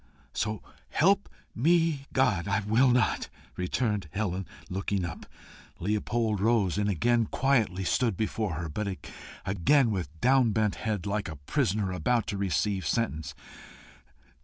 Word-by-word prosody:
"So 105 -1 -2 0.3
help 195 +5 +3 0.2
me 160 +1 +2
God, 115 -9 +2
I 105 +1 +1
will 110 +6 +3
not!" 125 -2 +1 0.3
returned 100 0 -1
Helen, 95 +1 -2 0.2
looking 95 0 -2
up. 85 - -7 0.5
Leopold 105 +2 0
rose, 105 -3 +2
and 105 0 +1
again 115 +5 +2
stood - - -20
quietly 115 -9 +1 0.3
before 110 -4 -1
her, 85 +1 -4
but 95 +4 -3 0.5
again 115 - +3
with 85 -6 -4
downbent 115 -3 +3
head, 105 -4 -3
like 100 0 -1
a 80 - -6
prisoner 100 - 0
about 120 +5 +1
to 100 - -2
receive 100 0 0
sentence. 80 -10 -1
105 Hz, 130 wpm, -28 LUFS, 95-120 Hz, 0.5 s, help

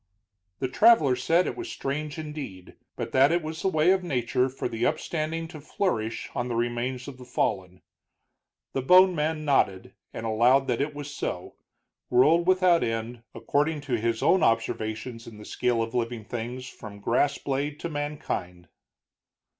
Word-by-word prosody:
The 130 - -1
traveler 155 - +5
said 165 +8 +2
it - - -3
was 355 0 -6
strange, 145 +2 -4
indeed, 150 - -7 0.2
but - - -5
that 135 +3 +5
it 170 0 +1
was 160 +1 -5
the - - 0
way 160 -1 +3
of 190 -1 +2
nature 130 -4 0
for 130 - -4
the 115 -1 -4
upstanding 165 +3 -1
to 155 -3 -10
flourish 115 - -2
on 120 - -2
the 120 - -3
remains 120 +2 -2
of 135 -3 -9
the - - -9
fallen. 95 -7 -2 0.9
The 135 - -1
bone 185 +6 +6
man 155 -1 -1
nodded, 95 -10 +1 0.2
and 115 - -6
allowed 120 +5 +4
that 120 +1 +1
it 145 +1 -2
was 145 0 -7
so, 90 - -4 0.6
world 155 +8 +4
without 185 -2 +4
end, 115 +1 -3
according 145 +7 0
to 140 -2 -5
his 115 0 -1
own 190 - +4
observations 115 -1 -1
in 110 -2 -10
the 105 - -11
scale 120 -2 0
of 115 +1 -6
living 120 -2 -2
things 120 +3 -5
from 105 -5 -10
grass 130 +7 +1
blade 145 +2 -3
to - - -2
mankind. 145 - -4
130 Hz, 170 wpm, -26 LUFS, 115-155 Hz, 0.9 s, bone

